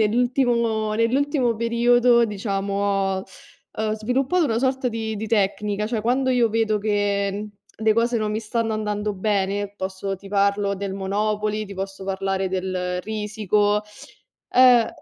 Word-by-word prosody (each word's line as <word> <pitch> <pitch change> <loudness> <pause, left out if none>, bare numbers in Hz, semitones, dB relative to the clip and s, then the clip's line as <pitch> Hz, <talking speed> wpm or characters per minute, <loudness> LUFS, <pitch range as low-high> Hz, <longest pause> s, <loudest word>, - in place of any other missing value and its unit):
nell'ultimo 235 -1 +1
nell'ultimo 245 +1 +1
periodo, 235 +1 +4
diciamo, 200 -2 -3
ho, 195 -1 0 0.5
uhm, 215 0 0
sviluppato 265 +10 +1
una 230 -5 0
sorta 260 0 0
di 220 -1 -3
di 215 +2 -4
tecnica, 210 -1 0
cioè 225 -2 -1
quando 255 +4 +1
io 245 -2 +3
vedo 220 -1 +1
che 205 0 -1 0.3
le 220 0 +4
cose 235 +1 +1
non 215 -2 -1
mi 210 - -1
stanno 225 0 -2
andando 210 -1 -2
bene, 200 0 -1
posso 190 0 -4
ti 195 +1 -12
parlo 200 0 +1
del 195 0 -4
Monopoly, 210 +2 -1
ti 200 -1 -9
posso 195 0 -6
parlare 195 0 -1
del 185 -1 -2
Risiko, 210 0 0 0.7
uhm 250 -3 +6
215 Hz, 140 wpm, -23 LUFS, 200-230 Hz, 0.7 s, uhm